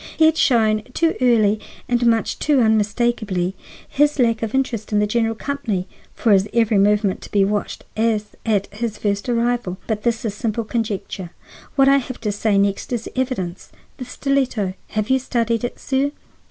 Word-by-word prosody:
He 320 - +5
had 320 0 +5
shown 220 -7 +3
too 330 -1 +2
early 220 -4 +4 0.3
and 245 0 +1
much 225 -1 +1
too 295 -3 +2
unmistakably 215 -4 +1 0.3
his 295 +1 +2
lack 230 -4 +2
of 225 +2 -2
interest 235 -6 -1
in 210 - +2
the 210 - +3
general 225 +1 0
company 220 -8 -3 0.3
for 225 - +1
his 195 +1 +4
every 225 -3 +3
movement 205 -1 +2
to - - -11
be 200 -1 +3
watched 205 +1 -2
as 220 -1 +1 0.2
at 205 -3 +1
his 220 0 -3
first 200 +2 -1
arrival. 235 -5 0
But 215 -2 -2
this 230 0 -1
is 215 - -1
simple 225 +2 -2
conjecture; 215 -5 -3 0.5
what 270 0 +5
I 275 0 +6
have 255 -2 -4
to 210 -2 -1
say 205 0 +1
next 200 +3 0
is 235 -2 -2
evidence. 245 -9 -3 0.3
The 255 - -6
stiletto—have 235 -5 -2
you 265 - +4
studied 235 -3 -1
it, 245 - -3
sir? 270 +1 0
225 Hz, 175 wpm, -21 LUFS, 205-245 Hz, 0.5 s, I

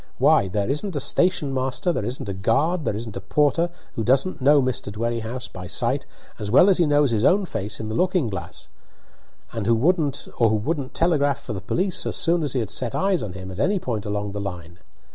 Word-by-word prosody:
Why, 95 - +4
there 100 +2 -1
isn't 150 - -2
a - - 0
station 155 -2 +1
master, 130 +7 -1
there 110 - -2
isn't 100 -4 -4
guard, 150 - +1
there - - 0
isn't 110 0 -6
a - - -6
porter, 150 - +1 0.2
who 110 - -2
doesn't 135 +8 +2
know 145 +2 +6
Mr. 130 -6 -1
Dwerrihouse 115 +3 -3
by 90 -1 -7
sight - - -1 0.3
as 105 - -4
well 140 - +6
as 190 - +3
he 170 - +4
knows 145 -3 +3
his 110 -1 0
own 195 +7 +4
face 110 - -4
in 110 - -5
the 110 - -4
looking 180 +1 +1
glass, 95 -5 -6 0.8
or 115 - -3
who 115 +3 +3 0.8
wouldn't 135 +5 -2
telegraph 145 -4 +1
for 125 -5 -6
the 95 - -5
police 180 - -1
as - - -1
soon 170 0 +2
as 145 -4 -2
he 130 - 0
had 105 -3 -4
set 120 +2 -1
eyes 195 -2 +1
on 105 -5 -5
him 95 0 -8
at 95 - -8
any 200 - +2
point 115 - -3
along 105 0 -2
the 100 +1 -4
line. 90 -3 -7
125 Hz, 215 wpm, -23 LUFS, 105-150 Hz, 0.8 s, know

